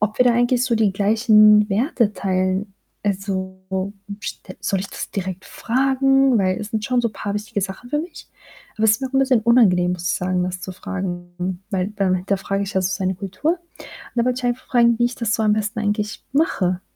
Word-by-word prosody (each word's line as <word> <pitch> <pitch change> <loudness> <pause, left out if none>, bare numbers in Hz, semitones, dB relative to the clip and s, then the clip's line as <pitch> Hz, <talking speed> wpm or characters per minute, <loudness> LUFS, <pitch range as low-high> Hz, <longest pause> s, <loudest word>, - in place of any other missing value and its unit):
ob 210 0 -1
wir 250 - +5
da 245 - +5
eigentlich 245 +1 +2
so 245 - +1
die 220 -3 +2
gleichen 210 +1 +5
Werte 230 - +1
teilen. 185 +1 -1 0.3
Also, 190 -2 -2 0.6
st 185 - -7
soll 190 0 0
ich 195 - -4
das - - -6
direkt 190 -1 -4
fragen? 270 +1 +2
Weil 185 -1 +1
es 210 - -5
sind 220 -2 -2
schon 250 +2 +1
so 235 - 0
paar 205 -1 -5
wichtige 210 0 -3
Sachen 195 +6 -6
für 295 - +1
mich, 330 +3 -7 0.5
aber 220 - 0
es 220 - +6
ist 215 - -1
mir 265 - -1
auch - - -21
'n - - +4
bisschen 265 -3 +3
unangenehm, 205 -7 +4
muss 175 -1 -6
ich - - +1
sagen, 180 0 0
das 180 0 -4
zu 190 - -6
fragen, 180 -1 -5
weil 190 -2 0
dann 195 -2 +2
hinterfrage 195 +2 -1
ich 200 0 -5
ja 190 - +2
so 185 - 0
seine 190 -1 -1
Kultur. 195 - -1
Und 350 - -19 0.6
da 235 - +2
wollte 255 +1 0
ich 250 - -9
einfach 245 +1 -1
fragen, 235 -2 +4
wie 240 - +3
ich 245 - -4
das 230 -2 -1
so 225 - 0
am 210 -1 +3
besten 215 +1 -2
eigentlich 210 +1 -2
mache. 185 - +1
210 Hz, 220 wpm, -21 LUFS, 190-240 Hz, 0.6 s, es